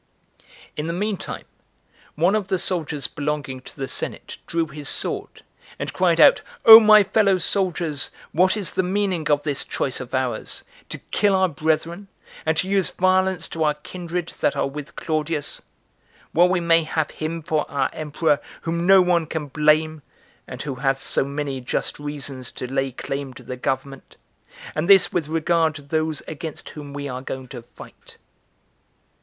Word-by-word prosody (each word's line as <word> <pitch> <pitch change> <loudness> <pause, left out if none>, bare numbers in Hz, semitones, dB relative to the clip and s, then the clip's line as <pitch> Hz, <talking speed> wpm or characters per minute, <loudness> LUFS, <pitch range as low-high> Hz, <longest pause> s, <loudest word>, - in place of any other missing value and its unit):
4. - - -29 0.3
In 150 +1 -3
the 165 - -2
mean 205 +4 -1
time, - - -7 0.7
one 175 +5 +2
of 210 -3 0
the 190 -1 0
soldiers 160 -6 -1
belonging 145 -3 -3
to - - -12
the 135 -1 -3
senate - - -4
drew 165 -1 0
his 150 -2 -3
sword, - - -1 0.3
and - - -5
cried - - +2
out, - - +7 0.2
"O 225 0 +13
my 215 -1 +7
fellow 200 -1 +3
soldiers, 175 -5 0 0.2
what 185 +5 +3
is 200 -4 +1
the - - +1
meaning 185 -3 -1
of 145 -1 +2
this 145 -3 0
choice 130 - -2
of 130 0 -5
ours, 130 -2 -2 0.3
to - - -4
kill 205 -2 +3
our 190 0 +3
brethren, 165 +4 -2 0.4
and 160 -1 +2
to 185 - +1
use 195 -1 +2
violence 185 -1 +1
to 160 - -2
our 150 -1 +2
kindred 175 +2 -5
that - - +1
are - - 0
with 145 +1 -8
Claudius? 155 -1 -2 0.7
while 175 +2 +4
we 185 -1 +1
may 165 -1 +4
have 155 -1 -2
him 160 +1 -5
for 155 -1 -1
our 140 - -1
emperor 150 -1 0 0.2
whom 170 +1 -2
no 195 -1 +7
one 170 -3 +1
can 150 -2 -4
blame, 155 +1 +2 0.5
and - - -6
who 145 -2 -4
hath 135 -1 +2
so - - +2
many 140 -1 -4
just 125 - -2
reasons 140 -4 -4
[to 125 - -7
lay 135 +1 -1
claim 135 +1 -5
to - - -11
the 125 - -6
government]; 135 +1 -4 0.6
and 160 +5 -2
this 195 -2 +6
with 165 -4 -1
regard 160 0 +1
to 145 - -8
those 155 +1 -1
against 155 0 -6
whom 145 -2 -9
we 145 0 -5
are 130 -1 -5
going 130 -1 -6
to 120 -1 -8
fight." 115 - -15
155 Hz, 175 wpm, -22 LUFS, 145-180 Hz, 0.7 s, O